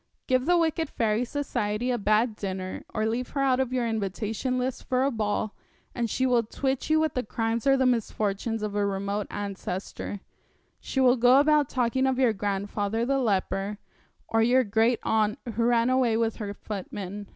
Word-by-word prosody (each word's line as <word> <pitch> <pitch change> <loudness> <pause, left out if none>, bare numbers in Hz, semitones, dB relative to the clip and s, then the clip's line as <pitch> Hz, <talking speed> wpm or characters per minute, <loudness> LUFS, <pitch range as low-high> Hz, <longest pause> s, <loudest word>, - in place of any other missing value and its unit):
Give 255 +2 +1
the 355 0 +5
wicked 325 -2 0
fairy 220 0 0
Society 245 -4 -2
a 240 - 0
bad 215 +2 +2
dinner, 190 -2 -5
or 215 - -1
leave 235 +3 -1
her - - +2
out 265 -2 +3
of 260 -2 0
your 250 -2 0
invitation 220 +3 -2
list 255 0 -3
for 255 0 +1
a 275 - +2
ball, 215 -2 -1 0.4
and 235 -2 -1
she 260 - 0
will 245 -2 +4
twit 265 +5 -2
you 315 0 +4
with 315 -2 +1
the 250 - 0
crimes 225 +2 -2
or 270 0 +5
the 260 - +2
misfortunes 225 -2 -1
of 210 -1 -3
a 205 0 +1
remote 200 +1 -2
ancestor 200 0 -5 0.6
she 270 - -3
will 255 -1 +5
go 245 +3 +6
about 295 -1 +3
talking 255 +1 +1
of 260 -1 +1
your 250 -4 +3
grandfather 205 +2 -2
the 275 +2 +1
leper, 200 -2 -1 0.5
or 225 - +2
your 250 +3 +4
great 225 +2 +2
aunt 215 -1 +1 0.2
who 230 +2 0
ran 235 +1 +3
away 250 -4 +2
with 225 -1 0
her 205 -2 -4
footman. 200 0 -6
230 Hz, 185 wpm, -27 LUFS, 210-255 Hz, 0.6 s, go